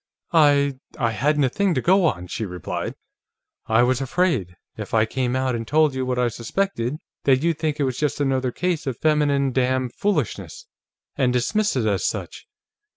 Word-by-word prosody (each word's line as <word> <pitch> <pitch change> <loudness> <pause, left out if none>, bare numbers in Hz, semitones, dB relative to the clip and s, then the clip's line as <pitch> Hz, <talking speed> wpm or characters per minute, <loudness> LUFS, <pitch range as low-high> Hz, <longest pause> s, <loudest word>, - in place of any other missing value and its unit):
"I 140 -4 +4 0.2
I 115 -3 +1
hadn't 145 +7 +1
a 130 - +3
thing 195 +3 0
to - - +2
go 190 +3 +4
on," 90 - -2
she 110 - -4
replied. 90 -4 -4 0.7
"I 110 +2 +4
was 130 +1 +1
afraid, 135 - 0 0.2
if 105 0 -5
I 110 0 +4
came 125 +2 -2
out 130 -1 0
and 115 -1 -4
told 155 0 +3
you 130 -1 -2
what 125 -1 -1
I 125 0 +2
suspected, 125 - -2 0.3
that 135 0 +3
you'd 165 -2 +1
think 155 -2 -1
it - - +2
was 130 -2 -2
just 150 -2 -1
another 135 -3 0
case 170 0 -2
of 130 -3 -2
feminine 145 -3 +2
dam 130 0 0
foolishness, 205 - -2 0.5
and 130 -3 +2
dismiss 200 - +1
it 125 -4 0
as 100 -3 0
such. - - -4
130 Hz, 185 wpm, -23 LUFS, 120-155 Hz, 0.7 s, I